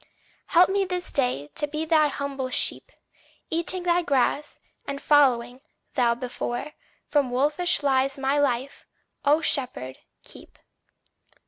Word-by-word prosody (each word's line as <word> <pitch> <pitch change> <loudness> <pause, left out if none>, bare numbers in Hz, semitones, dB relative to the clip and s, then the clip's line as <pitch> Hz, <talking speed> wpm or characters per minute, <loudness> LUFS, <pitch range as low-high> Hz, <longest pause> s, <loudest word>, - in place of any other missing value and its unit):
Help 350 +2 +5
me 395 0 +1
this 360 -1 -4
day 250 - -1
to 295 - +1
be 305 +2 -3
thy 310 -2 +4
humble 280 -2 -4
sheep, - - -1 0.6
Eating 340 +2 -1
thy 350 0 +2
grass, 285 -1 0 0.3
and 280 0 -4
following, 255 -4 +2 0.3
thou 240 -3 +2
before; 245 +3 -5 0.3
From 285 -4 +1
wolfish 295 +7 +1
lies 270 0 +1
my 275 +2 0
life, 265 -1 -2 0.4
O 295 +3 +4
Shepherd, 250 - -1 0.2
keep. - - -12
280 Hz, 125 wpm, -25 LUFS, 255-310 Hz, 0.6 s, Help